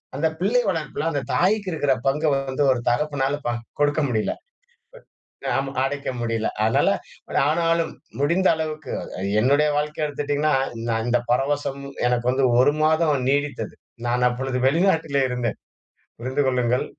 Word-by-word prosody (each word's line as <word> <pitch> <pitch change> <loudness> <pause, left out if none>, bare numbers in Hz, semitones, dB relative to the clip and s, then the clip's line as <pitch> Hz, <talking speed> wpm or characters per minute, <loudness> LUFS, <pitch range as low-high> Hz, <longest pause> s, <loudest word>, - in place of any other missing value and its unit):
அந்த 155 +4 +1
பிள்ளை 220 +7 +2
வளர்ப்புல 160 -3 -2
அந்த 145 -3 -1
தாய்க்கு 200 +2 +2
இருக்குற 145 -4 +1
பங்க 145 +3 +1
வந்து 135 +1 -1
ஒரு 130 - +1
தகப்பனால 140 +2 0
பா 120 - +1 0.3
கொடுக்க 145 +1 +2
முடியல. 110 -3 0 1.2
ஆமா 135 0 -1
அடைக்க 140 +1 -2
முடியல. 115 -1 -1 0.2
அதனால 110 - +3 0.6
ஆனாலும் 165 0 +1 0.3
முடிந்த 170 +6 +3
அளவுக்கு 155 -1 -4 0.5
என்னுடைய 140 +6 +3
வாழ்க்கைய 150 +1 -1
எடுத்துட்டீங்கன்னா 145 +1 0 0.4
நான் 115 0 0
இந்த 120 0 +3
பரவசம் 140 +2 0 0.3
எனக்கு 125 0 0
வந்து 130 +1 +2
1 140 +3 +5
மாதம் 155 -4 +2
நீடித்தது. 145 0 -1 0.3
நான் 125 +1 +2
அப்பொழுது 125 +1 -2
வெளிநாட்டிலே 160 -3 +2
இருந்தேன், 125 -1 -2 0.6
புரிந்து 130 +4 -1
கொள்ளுங்கள். 125 -1 +1
145 Hz, 130 wpm, -23 LUFS, 125-155 Hz, 1.2 s, 1